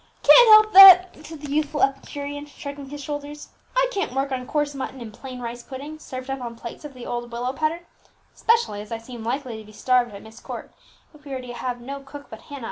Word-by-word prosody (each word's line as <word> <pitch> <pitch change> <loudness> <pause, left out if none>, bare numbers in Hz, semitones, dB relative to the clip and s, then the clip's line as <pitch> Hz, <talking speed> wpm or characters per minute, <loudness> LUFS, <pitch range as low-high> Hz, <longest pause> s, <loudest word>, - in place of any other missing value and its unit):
"Can't 485 -1 +8
help 430 0 +7
that," 370 -4 +9
said 320 -2 -10
the 290 -2 -7
youthful 300 0 0
epicurean, 285 +1 -3
shrugging 280 -1 -9
his 290 0 -8
shoulders; 290 +1 -7 0.3
"I - - +3
can't 395 - -3
work 270 +1 -1
on 255 -1 -4
coarse 295 -1 -1
mutton 265 -1 -6
and 225 -3 -9
plain 255 +2 -9
rice 240 0 -6
pudding, 285 +5 -9
served 255 -3 -8
up 270 -1 -4
on 235 -1 -6
plates 235 +4 -9
of 290 -3 -10
the 250 - -10
old 240 0 -5
willow 245 +2 -3
pattern; 315 +4 -2 0.5
specially 455 - +1
as 210 - -12
I 230 - -2
seem 230 0 -10
likely 245 -1 -4
to - - -11
be 215 - -16
starved 240 0 +1
at 200 - -11
Myst 220 +1 -14
Court, - - -8 0.4
if 300 -1 -19
we 280 -2 -8
are 260 - -4
to 245 -1 -8
have 245 0 -5
no 275 +3 -7
cook 280 +1 -12
but 220 - -10
Hannah. 285 -1 -10
275 Hz, 230 wpm, -23 LUFS, 245-295 Hz, 0.5 s, that